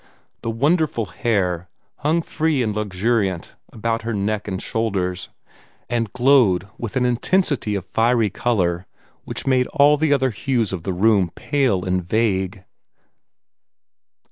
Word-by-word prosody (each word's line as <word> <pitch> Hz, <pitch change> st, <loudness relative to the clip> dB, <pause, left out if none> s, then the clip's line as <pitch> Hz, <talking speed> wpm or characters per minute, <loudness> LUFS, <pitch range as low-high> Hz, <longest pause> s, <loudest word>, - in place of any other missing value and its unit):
The -, -, -3 dB
wonderful 140 Hz, 0 st, +1 dB
hair 90 Hz, -3 st, -1 dB, 0.3 s
hung 160 Hz, +3 st, +1 dB
free 155 Hz, -6 st, 0 dB
and 110 Hz, -2 st, -1 dB
luxuriant 100 Hz, -2 st, -1 dB, 0.2 s
about 115 Hz, +1 st, -2 dB
her 115 Hz, -1 st, -3 dB
neck 105 Hz, +1 st, -2 dB
and 95 Hz, -2 st, -3 dB
shoulders, 95 Hz, -6 st, -2 dB, 0.6 s
and 115 Hz, -3 st, -1 dB
glowed 120 Hz, -8 st, +3 dB
with 115 Hz, 0 st, -6 dB
an 125 Hz, -1 st, +2 dB
intensity 125 Hz, -, +1 dB
of 95 Hz, -2 st, -4 dB
fiery 115 Hz, 0 st, +2 dB
color 90 Hz, -6 st, 0 dB, 0.4 s
which -, -, -5 dB
made 130 Hz, -1 st, +2 dB
all 150 Hz, -1 st, +4 dB
the 155 Hz, 0 st, +1 dB
other 130 Hz, -2 st, +2 dB
hues 115 Hz, -1 st, -1 dB
of 90 Hz, -, -3 dB
the 95 Hz, -, -3 dB
room 95 Hz, -1 st, +3 dB
pale 125 Hz, -11 st, 0 dB
and 90 Hz, -1 st, 0 dB
vague. 95 Hz, -1 st, 0 dB
110 Hz, 135 wpm, -21 LUFS, 95-125 Hz, 0.6 s, all